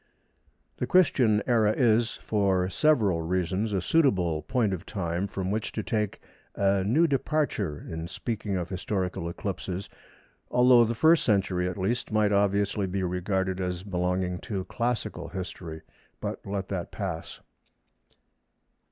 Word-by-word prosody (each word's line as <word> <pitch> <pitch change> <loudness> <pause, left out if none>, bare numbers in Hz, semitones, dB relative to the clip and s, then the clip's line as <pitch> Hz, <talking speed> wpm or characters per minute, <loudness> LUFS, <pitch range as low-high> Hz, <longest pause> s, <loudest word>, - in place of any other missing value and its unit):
The - - -2
Christian 125 - +4
Era 110 -4 +3
is, 115 -1 +2
for 95 -4 +1
several 110 - +3
reasons, 95 +5 -1
a 95 -2 0
suitable 90 - +2
point 115 - 0
of 90 -2 -4
time 95 -2 -2
from 95 -1 -3
which 110 +1 -2
to 110 - -3
take 105 -2 -1 0.4
a 100 -1 +2
new 130 - +3
departure 135 - -1
in 80 0 -5
speaking 105 +1 -3
of 90 -2 -3
historical 95 -2 -2
eclipses, 95 +1 -4 0.6
although 125 -1 +6
the 115 +1 -2
First 160 +6 +5
Century, 95 -4 +1
at 90 - -6
least, 110 +6 -1
might 105 -1 +3
obviously 100 0 +1
be 95 +1 -2
regarded 95 +1 -1
as 90 -1 -3
belonging 90 -1 -1
to 100 -4 -4
classical 115 -2 -2
history—but 85 -4 -7
let 100 -1 -3
that 90 -3 -3
pass. 90 -6 -5
100 Hz, 135 wpm, -27 LUFS, 90-110 Hz, 0.6 s, although